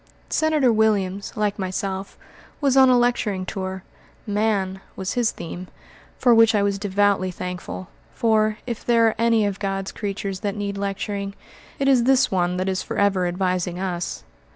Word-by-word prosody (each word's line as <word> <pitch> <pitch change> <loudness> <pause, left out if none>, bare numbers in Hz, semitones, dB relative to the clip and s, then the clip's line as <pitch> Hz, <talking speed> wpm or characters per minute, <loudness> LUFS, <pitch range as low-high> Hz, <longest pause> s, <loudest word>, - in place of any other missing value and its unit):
Senator 305 -6 +2
Williams, 205 -3 +1
like 210 -1 -1
myself, 190 +1 -3 0.4
was 275 -3 +2
on 265 -1 +7
a 250 - +5
lecturing 230 -6 +1
tour. 190 -1 -5 0.4
"Man" 205 -3 0
was 190 0 -3
his 240 -3 +2
theme, 175 +2 -7 0.5
for 245 -2 +4
which 225 -1 +6
I 205 - +3
was 200 0 0
devoutly 200 -1 +1
thankful; 180 0 -6 0.3
for, 215 -2 +2
if 235 -3 -5
there 230 -1 +4
are 220 - +2
any 230 -2 +3
of 200 -1 -2
God's 195 -1 -2
creatures 200 -2 -4
that 200 0 -2
need 200 -1 -3
lecturing, 200 0 -3 0.4
it 275 - 0
is 255 -3 +4
this 265 0 +4
one 180 -1 +1
that 185 +1 -1
is 190 -1 0
forever 195 -3 +1
advising 180 -1 -1
us. 180 -2 -3
200 Hz, 160 wpm, -23 LUFS, 190-225 Hz, 0.5 s, on